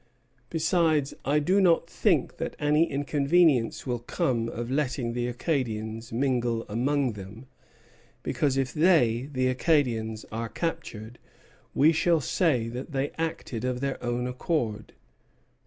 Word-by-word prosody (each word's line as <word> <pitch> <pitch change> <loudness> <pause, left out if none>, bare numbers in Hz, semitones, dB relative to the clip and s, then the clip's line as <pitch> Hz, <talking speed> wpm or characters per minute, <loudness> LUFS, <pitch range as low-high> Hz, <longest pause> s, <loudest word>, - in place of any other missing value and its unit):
Besides, 160 -3 +1
I 145 +2 +2
do 185 +7 +3
not 170 -2 +4
think 170 - +1
that - - -4
any 150 +3 +2
inconvenience 145 -2 +2
will 125 -2 -2
come 115 -1 -1
of 120 +2 -5
letting 130 -4 -1
the 120 0 -1
Acadians 115 -4 -3
mingle 120 -2 0
among 130 +4 0
them, 105 +5 -10 0.8
because 140 -3 0
if 135 -2 -1
they 145 -7 +3
[the 130 -2 +1
Acadians] 125 -6 +1
are 115 +1 -3
captured, 115 -6 -5 0.6
we 150 +4 +6
shall 165 +1 +2
say 135 -4 +1
that 125 +6 -7
they 135 +1 -1
acted 160 -8 -3
of 125 -1 -1
their 135 0 -3
own 120 0 -1
accord." 125 -4 -2
130 Hz, 130 wpm, -27 LUFS, 115-150 Hz, 0.8 s, we